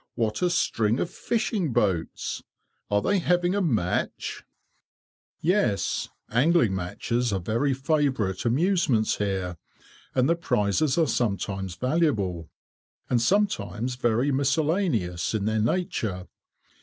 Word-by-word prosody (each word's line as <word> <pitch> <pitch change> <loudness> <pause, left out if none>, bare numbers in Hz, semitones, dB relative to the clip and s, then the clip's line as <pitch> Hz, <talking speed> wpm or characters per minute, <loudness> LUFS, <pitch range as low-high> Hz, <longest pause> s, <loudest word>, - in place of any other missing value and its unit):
What 110 -3 -1
a 180 - +3
string 115 -9 +1
of 170 - -2
fishing 215 - -1
boats! 95 -8 -1 0.5
Are 105 0 +2
they 200 0 +2
having 175 +1 +2
a 205 - +1
match?" 110 - -1 1.0
"Yes. 180 - +1 0.2
Angling 125 - +3
matches 115 +6 -1
are 95 - 0
very 115 +9 0
favourite 135 - 0
amusements 130 - +2
here, 95 -4 -2 0.6
and 130 0 +3
the 170 - +3
prizes 135 - +1
are 165 - +4
sometimes 100 - -2
valuable, 105 - 0 0.6
and 120 -2 +3
sometimes 125 - 0
very 125 +2 +1
miscellaneous 140 - 0
in 100 -2 -1
their 110 0 +1
nature. 110 - -1
120 Hz, 115 wpm, -26 LUFS, 100-165 Hz, 1.0 s, are